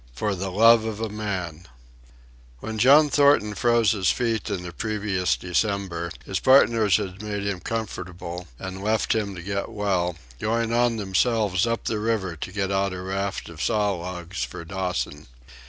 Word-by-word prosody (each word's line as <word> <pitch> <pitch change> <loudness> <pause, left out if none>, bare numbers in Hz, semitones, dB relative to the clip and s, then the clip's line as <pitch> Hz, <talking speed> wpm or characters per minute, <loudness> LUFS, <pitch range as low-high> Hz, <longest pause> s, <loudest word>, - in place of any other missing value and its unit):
For 100 - -1
the 95 +1 -3
Love 115 +4 +6
of 110 -1 -4
a 115 -1 -2
Man 95 -6 -4 0.9
When 110 - -5
John 145 +5 +6
Thornton 140 -7 +4
froze 120 0 +3
his 95 -4 +1
feet 115 -2 0
in 95 -3 -3
the 90 -1 -7
previous 100 -3 -1
December 90 -2 -1 0.2
his - - -2
partners 115 -6 +5
had 95 -2 -5
made 105 -1 -4
him 100 -2 -2
comfortable 90 -5 -5
and 95 +4 -7
left 110 +1 +1
him 105 -3 -2
to 85 - -8
get 100 +1 -3
well, 95 -4 -1 0.2
going 115 +1 0
on 120 -1 +2
themselves 105 0 +1
up 115 0 -1
the 110 - -1
river 105 -5 -1
to 85 - -6
get 100 -1 -2
out 95 0 0
a 90 - -5
raft 95 +1 -3
of 80 -2 -9
saw 105 -1 +1
logs 90 +1 -5
for 85 -2 -7
Dawson. 90 -5 -3
100 Hz, 170 wpm, -24 LUFS, 90-110 Hz, 0.9 s, Love